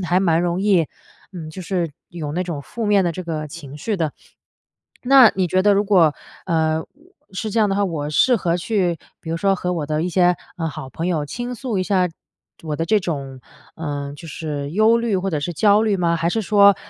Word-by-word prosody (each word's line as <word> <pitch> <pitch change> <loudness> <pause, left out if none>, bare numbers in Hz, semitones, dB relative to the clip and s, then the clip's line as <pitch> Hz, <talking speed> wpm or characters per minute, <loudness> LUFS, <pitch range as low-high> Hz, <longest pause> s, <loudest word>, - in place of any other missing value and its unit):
还 175 +3 +3
蛮 170 -4 +2
容 175 +2 -1
易， 185 -7 +3 0.5
嗯， 165 -4 -7
就 185 - -8
是 175 -3 -1 0.2
有 155 -4 -5
那 180 - -1
种 170 -5 -4
负 230 +6 -5
面 200 -2 +4
的 170 - 0
这 185 - -6
个 155 -3 -4
情 145 -3 -10
绪 205 +7 -2
的。 160 -4 -1 0.9
那 260 -2 +7
你 185 -1 +1
觉 185 +2 +1
得 205 0 +5
如 200 +1 +3
果， 175 -7 +4 0.3
呃， 160 -2 +1 0.5
是 215 +3 -3
这 225 - -1
样 210 -2 +3
的 - - +1
话， 205 - +2
我 150 -5 -3
适 245 - +4
合 170 -4 0
去 180 -4 0 0.2
比 160 - -7
如 165 - -1
说 195 +2 +2
和 180 -1 -2
我 155 -4 -2
的 155 +1 -1
一 180 - -1
些， 180 0 +3 0.2
呃， 165 -1 -1
好 130 -2 -8
朋 165 +5 -4
友 160 -5 0
倾 245 +10 -5
诉 245 -4 -3
一 185 - +1
下 185 -2 +2 0.6
我 155 -2 -3
的 165 - -1
这 215 +3 +2
种， 140 -7 -5 0.4
呃， 145 -3 -4
就 165 +3 -11
是 145 -1 -4
忧 220 +4 +4
虑 230 -4 0
或 190 +1 -1
者 155 -4 -1
是 170 +4 -3
焦 205 +5 +4
虑 215 -3 +2
吗？ 170 -2 +1
还 165 0 0
是 220 +5 0
说， 200 -1 +5
175 Hz, 240 characters per minute, -21 LUFS, 160-200 Hz, 0.9 s, 那